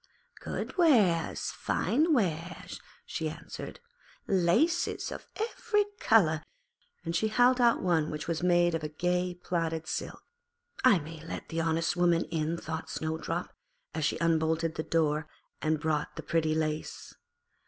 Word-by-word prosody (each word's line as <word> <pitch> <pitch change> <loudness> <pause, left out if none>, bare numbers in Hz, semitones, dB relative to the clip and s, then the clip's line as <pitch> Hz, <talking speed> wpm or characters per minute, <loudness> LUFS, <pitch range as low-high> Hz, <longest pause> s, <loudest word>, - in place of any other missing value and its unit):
'Good - - -5
wares, 210 - +3
fine 310 +7 +1
wares,' 180 - -1 0.2
she 160 -2 -3
answered, 155 - -8 0.5
'laces 195 - +2
of - - -8
every 440 -1 0
colour'; 160 -9 +4 0.6
and 165 0 -2
she 220 +6 +2
held 245 +3 +4
out 235 -4 +4
one 165 -4 +2
which 150 +1 -5
was 170 -1 -1
made 175 -1 +3
of 155 -1 -4
gay 180 0 0
plaited 165 -2 -2
silk. - - -4 0.6
'I 220 -8 +6
may 160 +1 -9
let 165 - -7
the 165 0 -1
honest 165 +1 +1
woman 175 -1 +3
in,' 160 +1 -1
thought 160 0 -5
Snowdrop, 160 0 -3 0.4
and 160 - -2
she 155 - 0
unbolted 160 0 +1
the - - -3
door 155 -1 +1 0.3
and 155 0 +1
bought 150 -1 -1
the - - -6
pretty 155 -2 +1
lace. 155 -1 -3
165 Hz, 140 wpm, -30 LUFS, 160-180 Hz, 0.6 s, I